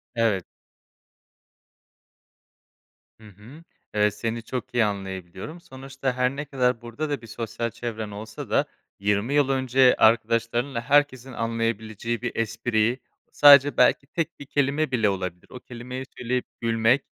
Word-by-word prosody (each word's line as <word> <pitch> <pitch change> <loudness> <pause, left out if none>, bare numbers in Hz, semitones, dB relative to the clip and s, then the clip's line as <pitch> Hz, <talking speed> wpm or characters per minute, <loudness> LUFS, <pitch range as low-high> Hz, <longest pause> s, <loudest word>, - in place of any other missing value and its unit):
Evet. 110 -6 +1 2.7
Hı 110 - -15
hı. 110 - -15 0.3
Evet, 105 -1 +2
seni 115 +1 -3
çok 125 0 -5
iyi 120 -2 +3
anlayabiliyorum, 95 - -6
sonuçta 135 -1 -5
her 125 +1 0
ne 145 +1 -4
kadar 125 -4 0
burada 120 +6 -5
da 145 -4 -2
bir 115 - -12
sosyal 115 +1 -4
çevren 110 -3 -5
olsa 105 +1 -8
da - - +2 0.3
20 105 +6 0
yıl 145 -2 +3
önce 130 -1 +4
arkadaşlarınla 115 +2 +2
herkesin 135 -1 +2
anlayabileceği 115 -1 -2
bir 125 -1 -2
espri 115 +1 0 0.3
sadece 145 -1 +7
belki 125 +2 +4
tek 165 +2 -3
1 145 - -8
kelime 145 +1 0
bile 115 -5 +2
olabilir. 90 -2 -4
O 125 - -9
kelimeyi 125 +2 -7
söyleyip 125 +1 -1 0.2
gülmek 115 +3 +2
120 Hz, 135 wpm, -25 LUFS, 110-130 Hz, 2.7 s, sadece